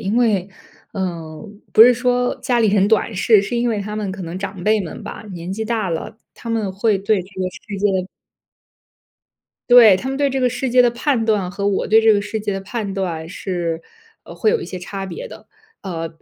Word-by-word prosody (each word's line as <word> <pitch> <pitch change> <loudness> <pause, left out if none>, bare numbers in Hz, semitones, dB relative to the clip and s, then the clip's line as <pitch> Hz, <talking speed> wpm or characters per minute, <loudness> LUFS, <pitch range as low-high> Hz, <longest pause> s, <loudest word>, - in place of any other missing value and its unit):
因 205 +4 -1
为， 205 -6 +2 0.4
呃， 170 -1 -5 0.2
不 - - +4
是 245 +2 +9
说 245 0 +1
家 245 -2 +1
里 225 - +3
人 200 0 +3
短 220 0 +1
视， 210 +2 +4
是 235 +4 -3
因 240 0 +1
为 215 -3 -1
他 210 +1 -5
们 210 -3 -3
可 190 0 -6
能 170 +2 -6
长 190 -1 -6
辈 215 0 +3
们 175 - -7
吧， - - -7
年 175 +1 -6
纪 220 +2 -3
大 220 -3 -1
了， 190 +7 -5 0.2
他 230 - -7
们 215 -4 -1
会 205 0 +1
对 200 -1 +1
这 185 - -16
个 185 - 0
世 200 +1 -8
界 190 -2 0 1.6
对， 230 -6 +8
他 260 - -5
们 270 - -2
对 285 -1 +2
这 265 0 -2
个 250 - +3
世 255 +2 -2
界 250 0 +6
的 245 - +3
判 240 -1 0
断 205 -5 0
和 200 +2 -3
我 200 - 0
对 220 +2 +5
这 220 -1 +5
个 205 - +2
世 205 +2 -4
界 205 -1 -3
的 195 - -3
判 205 0 -4
断 170 -4 -3
是， 170 -3 -3 0.4
呃， - - -11
会 435 - +2
有 460 -2 +1
一 - - -5
些 185 - -6
差 195 +2 -6
别 - - -7
的。 - - -13 0.3
呃， 165 -4 -4
205 Hz, 240 characters per minute, -20 LUFS, 190-230 Hz, 1.6 s, 是